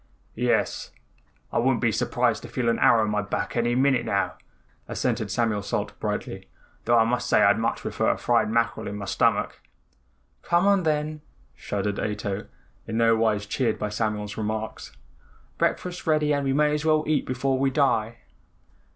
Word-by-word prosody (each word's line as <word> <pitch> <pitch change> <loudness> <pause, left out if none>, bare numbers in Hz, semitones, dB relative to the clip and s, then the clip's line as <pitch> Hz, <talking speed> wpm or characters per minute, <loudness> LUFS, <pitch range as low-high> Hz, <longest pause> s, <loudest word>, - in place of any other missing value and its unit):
"Yes, - - 0 0.6
I - - +2
wouldn't 120 0 +2
be 115 -2 +2
surprised 115 +1 0
to - - -9
feel 120 0 -1
an 115 - +1
arrow 115 -2 +5
in 105 - -2
my 105 0 +1
back 105 0 -3
any 120 0 +1
minute 130 -1 +3
now," 100 0 0 0.5
assented 110 - -2
Samuel 105 0 0
Salt 100 - -3
brightly, - - -4 0.4
"though 120 +1 +4
I 115 - +6
must 120 +2 -1
say - - +4
I'd - - +4
much - - -1
prefer - - -1
a - - +1
fried 120 -2 +1
mackerel 115 -1 0
in 100 - -5
my 100 -1 -5
stomach." - - 0 0.8
"Come 175 +2 +2
on 200 -1 +4
then," 155 -1 -1 0.3
shuddered 100 0 -3
Ato, 105 -1 -3 0.4
in 110 0 -3
no 115 0 +4
wise 110 -2 +1
cheered 115 +2 -1
by 105 - -3
Samuel's 105 -1 -3
remarks, 110 0 -4 0.7
"breakfast's 180 -1 -1
ready 150 -1 +2
and 140 -1 0
we 135 - +1
may 150 +1 +3
as 150 0 -1
well 155 -1 +3
eat 150 -2 0
before 130 +1 0
we 135 0 +2
die." 120 -5 +1
115 Hz, 175 wpm, -25 LUFS, 110-140 Hz, 0.8 s, I